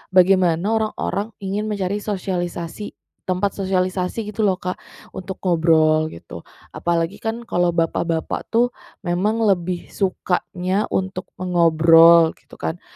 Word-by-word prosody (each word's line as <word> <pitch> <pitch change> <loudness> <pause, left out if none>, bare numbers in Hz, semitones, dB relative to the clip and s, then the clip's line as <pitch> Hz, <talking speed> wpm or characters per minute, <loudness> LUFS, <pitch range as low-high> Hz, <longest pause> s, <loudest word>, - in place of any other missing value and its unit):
bagaimana 180 -2 +4
orang-orang 215 -1 -2
ingin 205 +3 -2
mencari 200 0 -2
sosialisasi, 180 -1 -4 0.3
tempat 185 +2 -1
sosialisasi 185 +2 -1
gitu 220 - -2
loh 190 -3 +2
Kak, 180 -1 -5 0.3
untuk 190 0 -6
ngobrol 160 -2 +3
gitu. 85 - -10 0.3
Apalagi 170 +5 -1
kan 230 +1 -4
kalau 175 -4 +1
bapak-bapak 165 -1 -1
tuh 240 +2 +2 0.3
memang 210 +6 0
lebih 180 -3 -1
sukanya 185 0 -1
untuk 190 -1 -3
mengobrol 165 -2 +5
gitu - - -18
kan, 170 +2 -4
185 Hz, 115 wpm, -21 LUFS, 170-200 Hz, 0.3 s, mengobrol